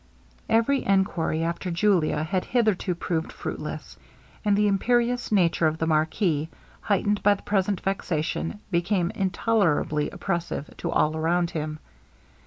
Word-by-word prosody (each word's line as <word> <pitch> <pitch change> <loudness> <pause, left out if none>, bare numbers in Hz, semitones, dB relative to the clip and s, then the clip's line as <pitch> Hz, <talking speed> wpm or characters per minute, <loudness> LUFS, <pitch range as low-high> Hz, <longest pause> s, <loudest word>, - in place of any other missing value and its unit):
Every 230 +5 +2
enquiry 185 -5 +1
after 170 +2 -2
Julia 170 -4 +2
had 185 +3 -1
hitherto 215 -6 +1
proved 165 -1 -2
fruitless; - - -6 0.5
and 205 -2 +3
the 210 0 +3
imperious 240 +5 +1
nature 170 -5 +3
of 155 0 -1
the 160 - -1
marquis, 160 0 +1 0.3
heightened 205 0 0
by 205 0 +4
the - - -14
present 195 -2 0
vexation, 175 0 -2
became 175 0 +1
intolerably 190 -6 +1
oppressive 170 -5 -3
to - - -3
all 155 +1 +2
around 170 +2 +1
him. 155 -1 -4
180 Hz, 130 wpm, -25 LUFS, 160-205 Hz, 0.5 s, by